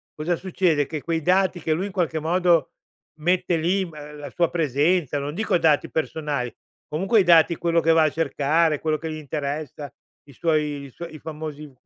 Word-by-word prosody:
cosa 165 +3 -1
succede, 175 -5 +1
che 155 -2 -5
quei 165 +1 -1
dati 185 +2 +2
che 155 - 0
lui, 180 +6 -2
in - - -8
qualche 170 -4 -1
modo, 170 +1 +2 0.5
mette 175 +1 +1
lì, 185 +4 +1
mhmm, 150 -3 -10
la 145 - -7
sua 170 -1 +1
presenza, 150 0 +1
non 140 +1 -4
dico 215 -1 +1
dati 155 -3 +2
personali. 150 -6 -2 0.3
Comunque 195 +9 +2
i - - +2
dati 170 -1 +5
quello 170 -1 +1
che 165 - +3
va 160 -1 +5
a 155 - +3
cercare, 155 +1 +1
quello 155 -1 0
che 160 +1 -5
gli - - -4
interessa, 145 -1 -5 0.3
i 145 - -16
suoi 150 0 0
i - - -11
suo 170 +7 -8
i 155 -2 -11
famosi 150 -2 -7
160 Hz, 190 wpm, -23 LUFS, 150-170 Hz, 0.5 s, dati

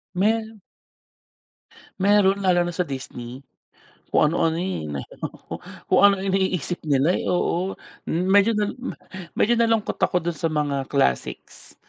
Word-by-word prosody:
Me 220 +3 +1 1.5
Meron 200 0 +4
lalo 175 -2 +3
na 175 - -4
sa 180 - -1
Disney. 130 -1 -7 0.7
Kung 150 - +4
ano-ano, 165 0 +1
eh, 185 - -3
nahilo 70 -2 -6
ko. - - -14 0.4
Kung - - +4
ano-ano'y 195 -1 +4
iniisip 185 -3 0
nila, 145 +4 +3
eh, - - -4
oo. 180 +1 0 0.3
Medyo 195 +6 +3
nal 210 -1 0
ma 255 - -5 0.4
medyo 240 +3 +3
nalungkot 225 -2 +1
ako 180 - +2
dun 170 -1 -3
sa 165 -3 -1
mga 145 -3 -1
classics. 135 - -2
180 Hz, 135 wpm, -23 LUFS, 150-200 Hz, 1.5 s, Meron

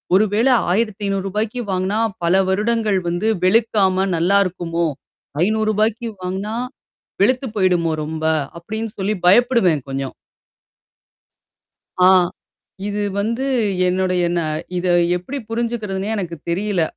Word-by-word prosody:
ஒரு 210 - +5
வேளை 250 +4 +4 0.2
ரூ.1500, 210 +1 -1
வாங்குனா, 190 +4 0 0.3
பல 190 +3 +4
வருடங்கள் 210 0 +1
வந்து 180 +6 0 0.2
வெளுக்காம 195 -2 +3
நல்லாயிருக்குமோ? 175 -2 +1 0.6
ரூ.500 215 +1 0
வாங்கனா. 195 +4 -3 0.7
வெளுத்து 255 +4 +2
போயிடுமோ 180 -4 +2
ரொம்ப. 160 +1 -5 0.4
அப்படின்னு 220 +5 -4
சொல்லி 200 +3 0
பயப்படுவேன் 200 - +4
கொஞ்சம். 135 0 -4 1.9
ஆ. - - +8 0.8
இது 205 0 -2 0.2
வந்து 230 +6 -1 0.4
என்னுடையன 180 -2 +1 0.4
இத 180 - -2 0.3
எப்படி 215 +11 -5
புரிஞ்சுக்கிறதுன்னே 220 -4 -2
எனக்கு 175 -4 -4
தெரியல. 190 0 0
200 Hz, 95 wpm, -20 LUFS, 180-220 Hz, 1.9 s, ஆ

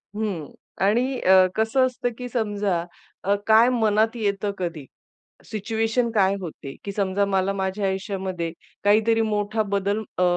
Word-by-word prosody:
हं. 200 -8 -3 0.3
आणि 245 +5 +1
अ, 185 0 +6
कसं 225 +4 +3
असतं, 255 -1 -2
की 250 - -5
समजा 205 -7 -1 0.4
अ, 200 +1 +2
काय 225 +2 +6
मनात 220 -2 +2
येतं 205 -2 -1
कधी, 170 -6 -4 0.6
सिच्युएशन 225 +3 -1
काय 200 -3 +3
होते, 150 -6 -7
की 200 - -4
समजा 200 0 0
मला 195 -1 +1
माझ्या 195 +1 -2
आयुष्यामध्ये 190 -3 -3 0.3
काहीतरी 220 +2 +4
मोठा 215 0 0
बदल, 200 0 -1 0.2
अ, - - +2
205 Hz, 140 wpm, -24 LUFS, 190-225 Hz, 0.6 s, अ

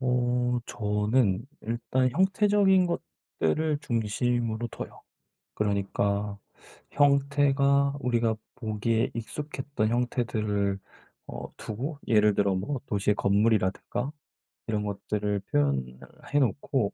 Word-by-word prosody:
어 125 -1 +1
저는 105 -1 +1 0.2
일단 120 +3 0
형태적인 190 - +4
것들을 155 - -2
중심으로 120 -1 -1
둬요. - - -8 0.5
그러니까 100 0 0 0.5
형태가 140 0 +3
우리가 120 -4 +1 0.2
보기에 110 0 0
익숙했던 135 -1 -3
형태들을 110 -5 0 0.5
어 - - -7
두고 135 +8 -5
예를 105 -2 +4
들어 100 -1 +2
뭐 130 +9 -2
도시의 105 -1 +1
건물이라든가 105 +5 +1 0.6
이런 105 -2 0
것들을 105 0 -2
표현을 65 -3 0 0.3
해 145 - +5
놓고 130 -3 0
115 Hz, 235 characters per minute, -28 LUFS, 105-140 Hz, 0.6 s, 해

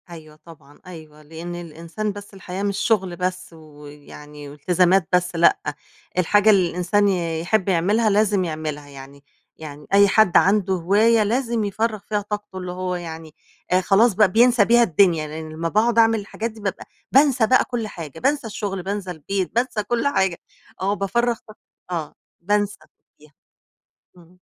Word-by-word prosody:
أيوه 155 -3 -12
طبعًا 145 -4 -16
أيوه، 155 -4 -12
لإن 165 +3 -8
الإنسان 170 +5 -5
بس 205 0 -11
الحياة 190 0 -6
مش 200 -1 -1
شغل 200 -6 0
بس 180 0 -4
ويعني 150 -1 -13
والتزامات 180 +4 +2
بس، 180 -1 +1
لأ، 170 +1 +4 0.6
الحاجة 205 +4 +3
اللي 190 -4 +4
الإنسان 180 +4 +1
ي 170 -4 -1
يحب 195 +3 0
يعملها 205 +6 +2
لازم 205 -1 +2
يعملها، 155 -3 -5
يعني 140 0 -13 0.3
يعني 150 -2 -10
أي 200 0 +6
حد 210 -2 +4
عنده 195 -1 +3
هواية 210 +6 +3
لازم 235 +1 -1
يفرّغ 215 +2 -2
فيها 210 +1 -3
طاقته 210 -1 -6
اللي 180 -1 -5
هو 180 0 -3
يعني 160 -2 -8 0.4
آآ 185 +1 +3
خلاص 205 +5 +3
بقى 200 -1 +3
بينسى 235 0 +4
بيها 235 +2 +5
الدنيا، 170 -4 +2
لإن 155 +1 -7
لمّا 165 +2 -4
باقعُد 230 +4 +2
أعمل 225 -1 +4
الحاجات 220 +3 -5
دي 220 - -15
بابقى 195 -2 -4 0.3
بانسى 270 -4 +4
بقى 255 - +4
كل 240 -4 -4
حاجة، 165 -8 -9
بانسى 275 -2 0
الشغل، 200 -3 -5
بانسى 195 -1 -4
البيت، 180 +5 -4
بانسى 240 -3 0
كل 240 +5 -1
حاجة، 190 -10 0 0.4
آه 195 +2 +1
بافرّغ 235 +4 -1
طاق 215 - -14 0.3
آه 160 -4 -4 0.3
بانسى 205 +2 -1 0.4
يه 150 +1 -19 0.9
إمم. 175 +1 -20
190 Hz, 160 wpm, -21 LUFS, 165-215 Hz, 0.9 s, أي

